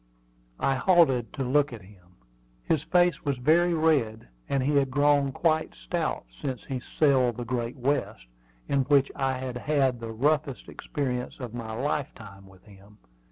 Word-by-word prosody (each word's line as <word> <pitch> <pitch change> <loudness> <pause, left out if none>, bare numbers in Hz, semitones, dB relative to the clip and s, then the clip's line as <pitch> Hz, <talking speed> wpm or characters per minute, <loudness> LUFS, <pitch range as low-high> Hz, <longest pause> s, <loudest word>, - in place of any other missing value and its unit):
I 135 - +2
halted 135 -6 +3
to 135 - -3
look 140 +3 +2
at 115 -5 -9
him. 90 -2 -19 0.5
His 155 - +1
face 175 -2 +2
was 140 -2 -1
very 170 +7 +3
red, 140 - +1 0.2
and 135 -2 +1
he 145 +2 +2
had 135 -1 +2
grown 145 0 +3
quite 160 +2 0
stout - - -3 0.2
since 130 -4 -4
he 130 -2 -4
sailed 130 -3 +2
the 120 - -4
Great 120 +1 -3
West, 130 - -2 0.4
in 140 - +1
which 140 -1 +3
I 135 -1 0
had 130 -1 -5
had 135 -2 +1
the 115 -1 -6
roughest 140 +3 0
experience 125 -3 -4
of 125 -4 -7
my 115 -2 -6
lifetime 115 -7 -4
with 95 -1 -19
him. 100 0 -18
130 Hz, 160 wpm, -27 LUFS, 115-145 Hz, 0.5 s, halted